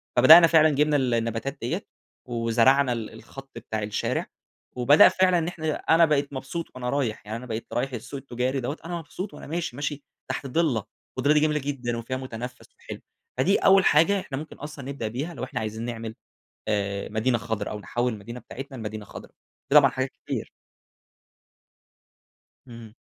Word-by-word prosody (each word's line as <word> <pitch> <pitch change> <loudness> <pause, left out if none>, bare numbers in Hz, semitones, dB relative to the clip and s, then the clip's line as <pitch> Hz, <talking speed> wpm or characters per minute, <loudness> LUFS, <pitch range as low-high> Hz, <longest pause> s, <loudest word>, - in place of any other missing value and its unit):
فبدأنا 130 +8 +9
فعلًا 160 -1 +6
جِبنا 150 +1 +2
ال 130 -3 +1
النباتات 115 +4 -2
دِيَّة، - - -3 0.4
وزرعنا 120 +3 +3
ال 115 -2 -5
الخط 135 +4 -12
بتاع 110 -1 -4
الشارع، 105 0 -2 0.5
وبدأ 135 +8 +7
فعلًا 185 -1 +3
إن 160 - -2
إحنا 160 -3 -2
أنا 165 +1 +4
بقيت 145 -2 0
مبسوط 140 +5 -4
وأنا 125 -1 -3
رايح، 125 -7 -2
يعني 110 +2 -4
أنا 125 - -9
بقيت 115 -1 -5
رايح 130 +2 -1
السوق 125 +4 -6
التجاري 130 +1 -2
دَوَّة، 135 +5 -3
أنا 175 +1 -4
مبسوط 180 +5 -7
وأنا - - -10
ماشي، 165 -5 -3
ماشي 145 +1 -4 0.3
تحت 140 - -4
ضِلّة، 135 -6 +1 0.3
والضِلّة 145 - +3
دي 150 - +4
جميلة 150 0 +2
جدًا 130 -4 -3
وفيها 130 +3 -4
متنفس 125 -1 -7
وحلو، - - -9 0.4
فدي 180 +10 +3
أوّل 195 -1 +5
حاجة 180 +7 +4
إحنا 135 -6 -6
ممكن 155 +2 -7
أصلًا 150 -2 -8
نبدأ 135 -5 -4
بيها، 140 +10 -4
لو 130 - -7
إحنا 130 - -4
عايزين 110 +1 -4
نعمل 115 -2 -5 0.5
آآ 100 -2 -1
مدينة 115 +3 +1
خضرا 115 -2 -3
أو 105 - -5
نحوِّل 120 +3 -1
المدينة 115 +4 -8
بتاعتنا 135 +2 -9
لمدينة 110 -2 -6
خضرا. - - -11 0.4
في 140 - +2
طبعًا 140 -2 +8
حاجات 130 +1 -2 0.2
كتير. - - -4 2.2
امم. 115 -3 -11
130 Hz, 175 wpm, -25 LUFS, 115-150 Hz, 2.2 s, فبدأنا